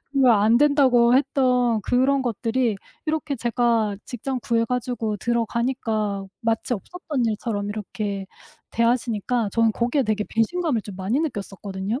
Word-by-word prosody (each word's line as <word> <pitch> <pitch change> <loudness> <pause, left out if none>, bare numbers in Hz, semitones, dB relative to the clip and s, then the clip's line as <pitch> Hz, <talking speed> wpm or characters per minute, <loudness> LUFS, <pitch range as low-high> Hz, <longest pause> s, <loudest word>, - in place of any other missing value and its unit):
그거 270 -3 +5
안 215 +2 +4
된다고 260 -5 +4
했던 250 -4 +2
그런 265 +4 +2
것들이 235 0 0 0.3
이렇게 310 -2 -1
제가 230 -3 +1
직장 255 +2 -4
구해 230 -1 +1
가지고 240 -3 -2
들어가니까 230 -3 -1
마치 230 +1 0
없었던 290 - -4
일처럼 210 -2 -2
이렇게 205 -1 -4 0.4
대하시니까 235 -1 0
저는 230 -1 +3
거기에 240 +5 +1
되게 215 -2 -1
배신감을 240 - 0
좀 200 -3 -9
많이 205 +10 0
느꼈었거든요. 200 - -4
235 Hz, 330 characters per minute, -23 LUFS, 215-255 Hz, 0.4 s, 그거